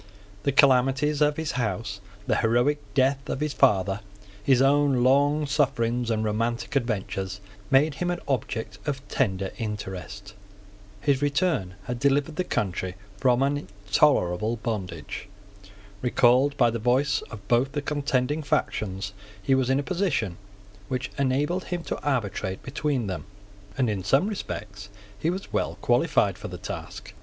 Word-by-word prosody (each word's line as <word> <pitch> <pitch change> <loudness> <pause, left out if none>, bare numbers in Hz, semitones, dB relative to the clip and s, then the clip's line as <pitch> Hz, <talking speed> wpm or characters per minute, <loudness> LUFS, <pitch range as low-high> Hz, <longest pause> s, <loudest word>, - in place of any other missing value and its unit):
The 140 - +1
calamities 135 +2 +4
of 150 0 +3
his 160 -2 -2
house, 110 -4 -2 0.2
the - - +1
heroic 120 +6 +2 0.2
death 135 0 +2
of - - -2
his 150 -1 -1
father, 100 -4 +3 0.4
his 130 +1 +4
own 135 -2 +4
long 145 +3 +4
sufferings 125 -4 +1
and 110 -1 +1
romantic 115 +5 -1
adventures, 95 -6 -2 0.3
made 145 +3 +4
him 175 +4 -2
an 175 0 -1
object 110 -5 -2
of 135 -1 -3
tender 95 -6 0
interest. 105 -1 -5 0.7
His 140 -2 +2
return 145 - +1
had 120 +4 -4
delivered 140 +3 +1
the 185 - +1
country 95 - -2 0.2
from 125 +1 +3
an 140 +1 +1
intolerable 100 -1 +1
bondage. 105 -5 -5 0.7
Recalled 125 +3 +4
by 120 - +4
the 115 - -3
voice 130 +5 +2
of 100 -3 -10
both 125 +4 +2
the 145 - -1
contending 145 0 0
factions, 100 -8 -1 0.3
he 135 - +2
was 130 -1 +2
in 135 +1 +3
a - - -1
position 145 - -1 0.5
which 130 +3 -3
enabled 145 +7 +1
him 175 -2 -3
to - - -4
arbitrate 105 -9 -2
between 140 -2 -1
them; 95 -2 -4 0.5
and 130 - +2
in 100 -4 -2
some 135 - +3
respects 105 - -6 0.3
he 160 - +1
was 190 +3 -4
well - - 0
qualified - - +2
for - - -6
the - - -7
task. - - -7
125 Hz, 150 wpm, -26 LUFS, 105-145 Hz, 0.7 s, calamities